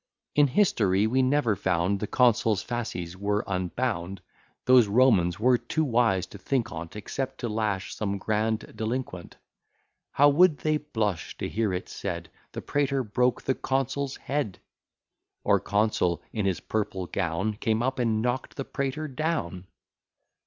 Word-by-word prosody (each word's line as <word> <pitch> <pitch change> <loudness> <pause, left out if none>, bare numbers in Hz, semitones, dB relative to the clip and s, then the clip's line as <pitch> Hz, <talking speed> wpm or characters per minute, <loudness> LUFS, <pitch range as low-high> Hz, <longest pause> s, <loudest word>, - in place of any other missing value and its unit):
In 145 -1 +5
history 105 - +2
we 130 +4 +2
never 130 -4 +2
found 95 +1 0
The 105 - -3
consul's 115 -4 +3
fasces 105 -8 -4
were 100 +2 -1
unbound: 95 0 -2 0.4
Those 125 -3 +6
Romans 100 -6 +3
were 125 +2 +4
too 160 - -1
wise 115 - +2
to 100 - -9
think 125 +2 -1
on't, 85 +2 -7
Except 130 +5 -4
to 120 - -1
lash 105 -3 -2
some 100 -2 -2
grand 110 +2 -1
delinquent, 110 -6 -4 0.8
How 145 - +6
would 160 +1 +5
they 155 0 +1
blush 110 - -3
to - - -3
hear 110 -2 0
it 90 0 -3
said, - - -5 0.2
The - - -6
praetor 140 -2 0
broke 125 +3 0
the 135 - +1
consul's 135 +1 -1
head! 135 -9 -2 0.9
Or - - +4
consul 100 -4 0
in 105 -3 0
his 90 -5 -1
purple 100 -4 -2
gown, 95 +4 -2
Came 110 +1 0
up 130 +1 -1
and 110 -2 +1
knock'd 125 +1 -2
the 135 - -3
praetor 140 +3 -3
down! 130 - -3
110 Hz, 150 wpm, -27 LUFS, 100-130 Hz, 0.9 s, Those